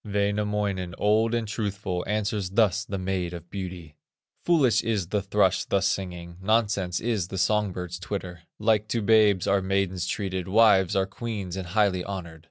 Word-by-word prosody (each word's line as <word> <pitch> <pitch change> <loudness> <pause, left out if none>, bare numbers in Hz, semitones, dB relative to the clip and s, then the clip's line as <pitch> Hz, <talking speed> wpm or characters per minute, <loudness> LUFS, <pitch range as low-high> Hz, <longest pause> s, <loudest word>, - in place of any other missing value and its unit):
'" - - -67
Wainamoinen, 100 -3 -1
old 110 +2 +2
and 115 -2 -1
truthful, 100 -4 -3
Answers 105 -2 -1
thus 100 -2 +2
the 100 - -4
Maid 90 -2 -2
of 85 0 -11
Beauty: 90 -6 -7 0.5
"Foolish 150 -9 +3
is 105 -6 -1
the 105 0 0
thrush 100 -1 +2
thus 100 -1 0
singing, 90 -3 -3
Nonsense 100 -4 +1
is 110 -7 -1
the 95 - -6
song 105 +1 +2
bird's 90 -1 -6
twitter; 90 -2 -5 0.2
Like 105 0 +2
to 115 0 -1
babes 105 -3 +4
are 100 0 +2
maidens 95 -2 -1
treated, 95 -3 -3
Wives 95 -3 +4
are 95 0 +2
queens 100 -2 -5
and 95 -2 -5
highly 95 -1 +1
honored. 90 -5 -6
100 Hz, 170 wpm, -26 LUFS, 90-105 Hz, 0.5 s, babes